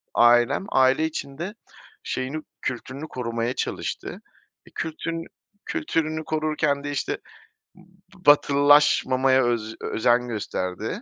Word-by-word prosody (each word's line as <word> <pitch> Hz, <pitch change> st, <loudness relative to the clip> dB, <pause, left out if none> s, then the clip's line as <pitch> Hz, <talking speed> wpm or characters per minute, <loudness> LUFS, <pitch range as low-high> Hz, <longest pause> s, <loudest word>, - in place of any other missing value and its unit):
ailem 120 Hz, +9 st, +4 dB
aile 130 Hz, +4 st, +3 dB
içinde 160 Hz, +6 st, -5 dB, 0.5 s
şeyini, 130 Hz, +4 st, -3 dB, 0.2 s
kültürünü 130 Hz, +4 st, -5 dB
korumaya 115 Hz, 0 st, -2 dB
çalıştı. -, -, -4 dB, 0.4 s
Bir -, -, -18 dB
kültün 165 Hz, +1 st, -4 dB, 0.4 s
kültürünü 160 Hz, -, -1 dB
korurken 155 Hz, -2 st, 0 dB
de, 145 Hz, -, -3 dB
işte, 140 Hz, -, -2 dB, 0.6 s
b -, -, -20 dB, 0.5 s
batılılaşmamaya 140 Hz, -2 st, +5 dB
öz 110 Hz, -2 st, -1 dB
özen 120 Hz, +2 st, +1 dB
gösterdi. 110 Hz, -, -4 dB
135 Hz, 100 wpm, -24 LUFS, 120-155 Hz, 0.6 s, batılılaşmamaya